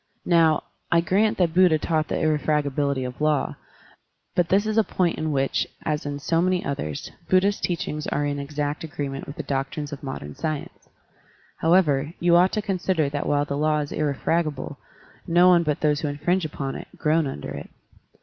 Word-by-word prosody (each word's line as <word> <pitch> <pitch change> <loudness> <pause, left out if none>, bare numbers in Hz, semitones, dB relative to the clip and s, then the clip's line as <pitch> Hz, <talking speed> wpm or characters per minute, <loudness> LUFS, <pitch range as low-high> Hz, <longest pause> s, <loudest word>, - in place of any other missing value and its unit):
*' - - -46
Now, 165 -3 +4 0.3
I 170 - +5
grant 200 +5 +2
that 170 -3 +2
Buddha 180 -3 +5
taught 155 0 0
the - - -1
irrefragability 145 -3 +1
of 125 +3 -6
law, 150 -2 +1 0.8
but 175 -1 +1
this 200 +2 +3
is 215 +1 +2
a - - +5
point 180 -4 0
in 155 0 -1
which, 135 -1 0 0.2
as 150 -1 -1
in 145 0 -3
so 165 +4 +1
many 180 0 +1
others, 75 - -4 0.2
Buddha's 195 +2 +3
teachings 150 -3 -2
are 145 - 0
in 145 0 -2
exact 145 +1 -3
agreement 140 -3 -5
with 140 - -7
the - - -5
doctrines 140 +2 -3
of 145 - -7
modem 75 - -6
science. 155 -2 -5 0.7
However, 160 -3 +3
you 175 0 +4
ought 180 +2 +5
to 215 - -1
consider 185 -6 0
that 145 0 -3
while 145 0 +2
the 140 - -3
law 155 +1 +2
is 145 -1 -3
irrefra 155 +3 0
gable, 145 -2 -6 0.5
no 175 +2 +5
one 175 -1 +6
but 150 -3 -1
those 150 -2 +2
who 155 - -2
infringe 165 +5 0
upon 140 -3 -4
it - - -7
groan 155 0 +2
under 75 - -6
it. - - -7
155 Hz, 190 wpm, -24 LUFS, 145-175 Hz, 0.8 s, one